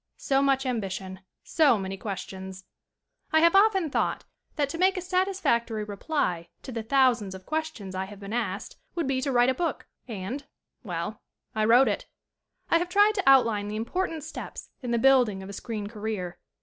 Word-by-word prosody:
So 270 0 +1
much 270 -1 +2
ambition; 195 -6 -3 0.2
so 290 -8 +4
many 195 -1 -4
questions! 190 -1 -7 0.7
I 315 - +5
have 335 +2 +5
often 390 -6 +4
thought - - 0 0.3
that 290 -2 +1
to 330 - -5
make 375 +1 +3
a - - +1
satis 370 +1 0
factory 230 - +1
reply 200 - -2
to 265 - -7
the 230 -2 -3
thousands 240 -5 +2
of 185 0 -11
questions 310 -12 -3
I 190 0 -2
have 200 0 -11
been 200 +1 -7
asked 215 -4 -3 0.2
would 340 -3 0
be 265 -1 0
to 275 +1 -1
write 245 0 +4
a - - +3
book, 335 +5 -2 0.2
and 225 +5 -5 0.4
well, 180 +1 -4 0.3
I 215 0 +1
wrote 245 +4 +6
it. - - -2 0.6
I 335 - +5
have 350 +1 -2
tried 410 +3 +5
to 385 -9 +2
outline 230 -6 +4
the 210 - -4
important 320 +8 -2
steps 315 - -8
in 250 - -5
the 235 - +2
building 240 -6 +4
of 190 - -9
a - - -7
screen 215 0 -5
career. 205 -4 -4
235 Hz, 190 wpm, -27 LUFS, 200-305 Hz, 0.7 s, wrote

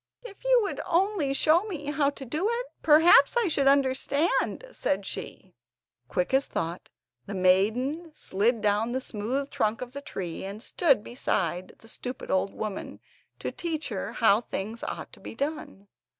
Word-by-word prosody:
"If 440 -3 -11
you - - +5
would 400 - -3
only 360 -4 +1
show 310 +5 +4
me 300 -8 -4
how 285 -1 +2
to 280 -1 -8
do 310 - -1
it, 480 +1 -2 0.2
perhaps 315 - +6
I 470 -4 +3
should 280 -4 +1
understand," 280 - +2
said 195 - -1
she. 190 -1 -7 0.5
Quick 180 - -1
as 270 +1 +3
thought, 165 +2 -4 0.4
the 200 - -5
maiden 220 - +2
slid 220 +1 0
down 210 +3 +1
the 260 - 0
smooth 255 +4 -3
trunk 215 +1 0
of 250 0 -7
the 280 - -6
tree, 180 -11 -5
and 200 +4 -7
stood 275 -10 +2
beside 185 -7 -2
the 225 - -18
stupid 250 +2 -6
old 190 +1 +1
woman, 215 -3 -5 0.4
to - - -4
teach 320 -3 -3
her 205 0 -4
how 220 -2 +4
things 220 0 -5
ought - - -6
to - - -14
be - - -9
done. 280 -8 -4
260 Hz, 165 wpm, -27 LUFS, 205-310 Hz, 0.5 s, perhaps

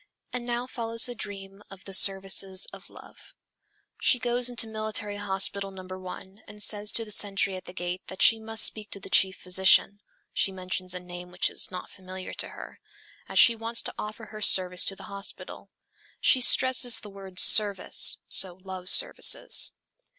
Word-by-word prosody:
And 245 -1 -5
now 240 0 -3
follows 230 -2 -2
the 245 - -6
dreams 200 -3 -8
of 195 -1 -13
the 195 - -7
"services 195 0 +2
of - - -12
love." - - -16 0.6
"She 255 - +3
goes 245 0 +1
into 240 -2 +1
Military 215 -2 -4
Hospital 195 0 -2
No. 190 -1 -11
1, 185 +2 -10
and 210 0 -3
says 210 0 0
to 225 - -2
the 210 - -10
sentry 200 -1 0
at 185 - -10
the - - -10
gate, 180 0 -5
that 190 - -3
she 225 - +5
must 225 0 0
speak 215 -1 -2
to 200 - -5
the - - -13
chief 190 -1 +2
physician... 190 +2 +2 0.3
(she 195 - 0
mentions 185 -1 -5
a - - -4
name 180 0 -11
which 180 0 -2
is - - +4
not 180 -1 -9
familiar 185 -1 -9
to - - -6
her), - - -12 0.5
as - - -5
she 235 - +6
wants 230 +1 -3
to - - -4
offer 215 +1 -8
her 215 0 -11
service 180 -3 +3
to 195 - 0
the - - -13
hospital. 200 0 -9 0.5
She 260 - +3
stresses 250 -1 +5
the 210 - -12
word 195 -2 -13
'service,' 205 -2 +5
so 180 -2 +1
love 185 -1 -6
services. - - +3
195 Hz, 180 wpm, -26 LUFS, 185-220 Hz, 0.6 s, she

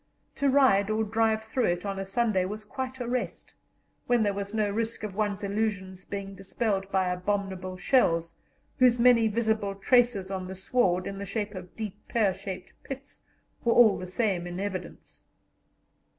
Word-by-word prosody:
To 280 - +2
ride 260 -8 +4
or 215 +1 +1
drive 220 0 +1
through 230 +3 0
it 175 +2 0
on 195 -1 -3
a 195 - -4
Sunday 205 -2 +1
was 210 +3 -5
quite 260 +4 -5
a 245 - -3
rest, 240 -8 -3 0.5
when 240 -2 +3
there 205 -1 +1
was 200 0 -4
no 215 -1 +1
risk 225 +1 -2
of 210 -2 -4
one's 205 -1 -1
illusions 195 -3 -2
being 200 -1 -5
dispelled 195 0 -2
by 190 -1 +2
abominable 185 0 -2
shells, 170 -6 +2 0.5
whose 250 -1 +5
many 235 -2 +5
visible 220 -2 0
traces 220 -2 +2
on 185 -1 -3
the 190 - -6
sward, 185 -3 +1
in 195 0 -5
the 200 - -4
shape 205 +1 -3
of 185 -2 -9
deep 215 -2 -7
pear 210 -5 +2
shaped 185 -1 -7
pits, 275 +1 -9 0.4
were 235 - +3
all 225 -4 +6
the 185 - -6
same 185 -2 0
in 175 +1 -5
evidence. 190 -3 -6
205 Hz, 175 wpm, -28 LUFS, 190-225 Hz, 0.5 s, all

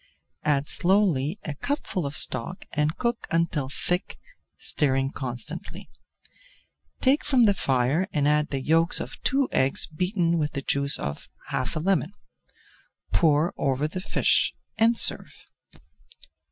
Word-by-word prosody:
Add 145 -1 +1
slowly 175 -4 +1
a 155 - -3
cupful 185 - -3
of 140 - -3
stock 130 +8 +1
and 150 0 0
cook 235 -1 -2
until 165 -5 -1
thick, 180 +5 -2 0.4
stirring 135 -2 +1
constantly. 125 -4 -5 1.1
Take 275 +3 +4
[Page - - -8
326] - - -3
from 260 -4 +4
the 205 -3 +5
fire 135 +3 0
and 145 -2 0
add 150 0 +2
the 135 -2 -3
yolks 165 +3 +2
of - - -7
two 275 0 +1
eggs 130 +1 +4
beaten 175 0 -1
with 150 -1 -2
the 140 -2 -4
juice 140 +1 +2
of 70 +1 -6 0.2
half 130 - -3
a - - -1
lemon. 185 +1 0 1.0
Pour 155 0 +2
over 140 +2 0
the 185 +4 -6
fish - - +1 0.2
and 230 +1 +3
serve. - - +1
155 Hz, 140 wpm, -25 LUFS, 140-185 Hz, 1.1 s, the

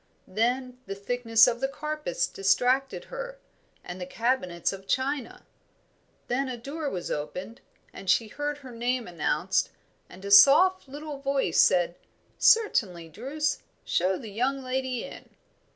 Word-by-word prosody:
Then 250 +5 -1
the 195 - -4
thickness 225 +2 +3
of 240 -1 0
the 270 - 0
carpets 300 - -3
distracted 250 +8 +1
her, - - -6 0.5
and 180 +1 -8
the 180 - -5
cabinets 185 -6 -1
of 195 0 -10
china. 265 +1 -2 0.8
Then 260 +2 -1
a 250 - -4
door 285 +5 -4
was 180 -7 -5
opened, 185 - -5 0.3
and 195 - -8
she 220 +5 +3
heard 290 +5 -4
her 265 -3 -11
name 240 +1 -2
announced, 170 -3 0 0.4
and 190 +2 -12
a 200 - -4
soft 295 - +7
little 290 +1 -7
voice 275 0 0
said, 175 -1 +3 0.4
"Certainly, 195 - +3
Druce. 280 - -2 0.3
Show 185 +2 +1
the 215 - -9
young 260 +6 -1
lady 255 -1 -2
in." - - -10
245 Hz, 140 wpm, -27 LUFS, 195-275 Hz, 0.8 s, soft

